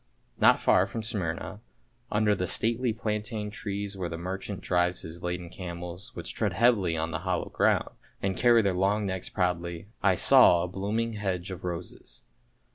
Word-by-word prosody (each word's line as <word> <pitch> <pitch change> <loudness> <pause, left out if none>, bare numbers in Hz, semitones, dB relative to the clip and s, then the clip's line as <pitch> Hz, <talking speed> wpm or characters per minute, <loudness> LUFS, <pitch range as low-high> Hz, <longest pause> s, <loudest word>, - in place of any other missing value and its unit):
Not - - +6
far 90 - +4
from 110 +2 -5
Smyrna, 100 -3 -3 0.5
under 105 0 +3
the 90 -2 -1
stately 115 +5 +1
plaintain 105 -1 -3
trees 100 -1 -4
where 90 -3 -3
the 85 - -5
merchant 95 +3 -5
drives 90 0 +1
his 80 +2 -8
laden 90 0 -3
camels, 90 0 -7
which - - -4
tread - - -1
heavily 105 -9 +3
on 80 +1 -2
hallowed 90 -1 -2
ground, - - +2 0.3
and 95 -1 -1
carry 120 0 +5
their 100 -2 +2
long 100 +3 +1
necks 95 -1 -3
proudly, 90 0 -2
I 95 -2 +4
saw 85 0 +6
a - - -2
blooming 105 +5 -2
hedge 95 -3 -3
of 95 0 -7
roses. 90 -1 -6
95 Hz, 165 wpm, -28 LUFS, 90-105 Hz, 0.5 s, Not